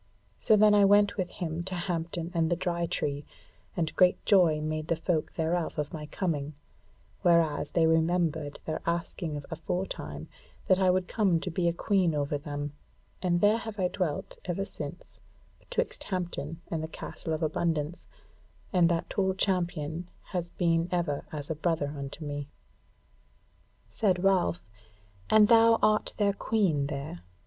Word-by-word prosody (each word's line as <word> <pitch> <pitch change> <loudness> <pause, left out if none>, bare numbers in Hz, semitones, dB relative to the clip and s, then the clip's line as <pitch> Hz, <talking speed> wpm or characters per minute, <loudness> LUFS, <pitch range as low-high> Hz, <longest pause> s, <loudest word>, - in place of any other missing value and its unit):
So 215 - +5
then 210 0 +6
I 205 -1 +6
went 205 0 +5
with 185 -3 -2
him 165 -2 -4
to 190 -1 -4
Hampton 170 -1 -3
and 165 -2 +1
the 175 - +2
Dry 170 -1 -1
Tree, 145 -2 -1 0.5
and 160 -2 -1
great 180 -1 +4
joy 175 -7 +5
made 155 0 -3
the 165 - +2
folk 165 -1 -1
thereof 165 +1 -1
of 150 -1 -2
my 150 -2 -6
coming, 150 -4 -2 0.7
whereas 165 -4 +3
they 165 -2 +3
remembered 160 -2 +1
their 155 - -3
asking 170 -2 -2
of 145 - -7
aforetime 155 - -4 0.4
that 185 - +4
I 190 -1 +4
would 180 0 +2
come 195 -7 +2
to 180 - -3
be 170 +1 0
a - - +4
Queen 180 -2 +1
over 145 0 -1
them, 145 -1 -5 0.5
and 175 -1 +1
there 210 +2 +4
have 220 -2 -7
I 180 -1 +2
dwelt 180 -7 -3
ever 190 +2 -2
since - - -8 0.4
betwixt - - -3
Hampton 170 -4 -4
and 165 -2 -1
the 160 - -3
Castle 160 - -7
of 155 - -2
Abundance; 155 0 -1 0.7
and 175 -2 +5
that 170 -1 0
tall 190 -1 0
champion 175 -3 -1 0.2
has 175 -3 -2
been 170 0 +1
ever 170 -5 -1
as 150 0 -5
a - - -1
brother 155 -2 -1
unto 140 +3 -6
me." 145 -1 -4 1.4
Said 185 -4 +1
Ralph, 185 -3 +2 0.6
"And 215 -1 +7
thou 230 0 +6
art 215 0 +2
their 200 -2 +2
Queen 190 -10 +1
there?" 140 - -5
170 Hz, 160 wpm, -29 LUFS, 155-185 Hz, 1.4 s, And